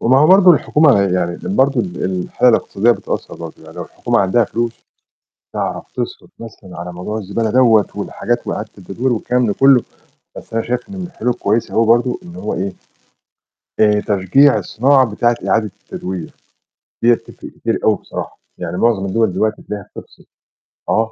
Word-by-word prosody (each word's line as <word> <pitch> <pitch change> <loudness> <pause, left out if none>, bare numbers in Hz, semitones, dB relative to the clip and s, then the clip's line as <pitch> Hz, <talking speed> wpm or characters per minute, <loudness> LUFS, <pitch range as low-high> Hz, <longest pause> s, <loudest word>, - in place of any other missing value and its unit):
وما 130 +3 +4
هو 150 - +5
برضه 185 +1 +7
الحكومة 150 -2 +4
ه 100 - +4
يعني 90 -3 0
ال 95 +3 -5
برضه 135 -1 +3
ال 90 -3 -4
الحالة 95 +6 +1
الإقتصادية 115 0 +2
بتأثّر 120 - -3
برضه، 80 -1 -8
يعني - - -14
لو - - -4
الحكومة - - -1
عندها 100 +5 +3
فلوس، 115 0 -2 0.8
تعرف - - -3
تِصرف - - -5
مثلًا 95 -6 -10
على 90 0 -6
موضوع 90 +5 -5
الزبالة 110 +2 -2
دَوَّة 115 -4 +4
والحاجات - - -3
وإعادة - - -3
التدوير 110 +7 -2
والكلام 125 +2 0
ده 105 - +1
كُلّه، 135 -3 +5 0.6
بس - - -12
أنا 115 - +1
شايف 125 +5 -3
إن 200 - -8
من 185 - -4
الحلول 145 -9 -2
الكويسة 110 +1 -1
هو 115 - +3
برضه 120 +5 +2
إن 175 -1 -11
هو 105 - -4
إيه، 95 +1 -3 1.1
آآ، 105 -1 +4
تشجيع 105 +7 +3
الصناعة 130 +7 +3
بتاعة 120 +2 +2
إعادة 110 -2 +1
التدوير، 90 -3 -6 0.7
دِيَّة 120 +1 +6
تِفرق 115 - -11
كتير - - -2
أوي - - +4
بصراحة، - - -7 0.2
يعني 90 0 -4
مُعظم 110 -4 +2
الدوَل 110 +1 +1
دلوقتي 110 +3 -1
تلاقيها 105 -2 -7
بتفصل، - - -12 0.7
آه، 110 0 +1
115 Hz, 175 wpm, -17 LUFS, 95-125 Hz, 1.1 s, برضه